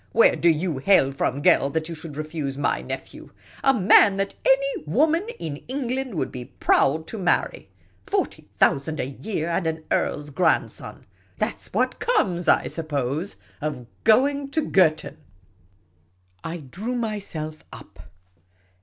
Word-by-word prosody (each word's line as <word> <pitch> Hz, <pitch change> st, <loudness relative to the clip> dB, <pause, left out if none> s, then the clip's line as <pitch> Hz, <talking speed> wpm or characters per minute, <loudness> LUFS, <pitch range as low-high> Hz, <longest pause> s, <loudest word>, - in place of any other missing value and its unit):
Where -, -, +5 dB
do 170 Hz, -, +3 dB
you 160 Hz, -2 st, 0 dB
hail 140 Hz, -4 st, +4 dB
from, 140 Hz, +1 st, -2 dB
girl, 140 Hz, -, +4 dB
that 155 Hz, +2 st, -2 dB
you 170 Hz, -, -5 dB
should 160 Hz, -2 st, -9 dB
refuse 155 Hz, -3 st, -4 dB
my 145 Hz, -, 0 dB
nephew? -, -, -8 dB, 0.3 s
A 270 Hz, -, +6 dB
man 200 Hz, -3 st, +5 dB
that 195 Hz, 0 st, -1 dB
any 275 Hz, -, +2 dB
woman 310 Hz, -, +2 dB
in 155 Hz, -3 st, -5 dB
England 260 Hz, -2 st, -3 dB
would -, -, -2 dB
be 125 Hz, -1 st, -7 dB
proud 145 Hz, +4 st, +1 dB
to 220 Hz, -, -7 dB
marry! 180 Hz, -2 st, 0 dB, 0.4 s
Forty 395 Hz, -1 st, -2 dB
thousand 150 Hz, +3 st, +2 dB
a 130 Hz, -, -2 dB
j'ear, 165 Hz, +1 st, -4 dB
and 170 Hz, 0 st, 0 dB
an 160 Hz, 0 st, -3 dB
earl's 145 Hz, 0 st, -1 dB
grandson! 165 Hz, +3 st, -1 dB, 0.3 s
That -, -, -2 dB
's -, -, -11 dB
what -, -, 0 dB
comes, 180 Hz, -, 0 dB
I -, -, +4 dB
suppose, 155 Hz, +2 st, -3 dB, 0.3 s
of 145 Hz, -5 st, -4 dB, 0.2 s
going 275 Hz, +5 st, +3 dB
to 310 Hz, +2 st, -1 dB
Girton! 160 Hz, -5 st, +2 dB, 0.7 s
" 85 Hz, 0 st, -39 dB, 0.3 s
I 165 Hz, +1 st, -4 dB
drew 185 Hz, -, -5 dB
myself 195 Hz, -9 st, -4 dB
up. -, -, -13 dB
165 Hz, 150 wpm, -24 LUFS, 150-225 Hz, 0.7 s, A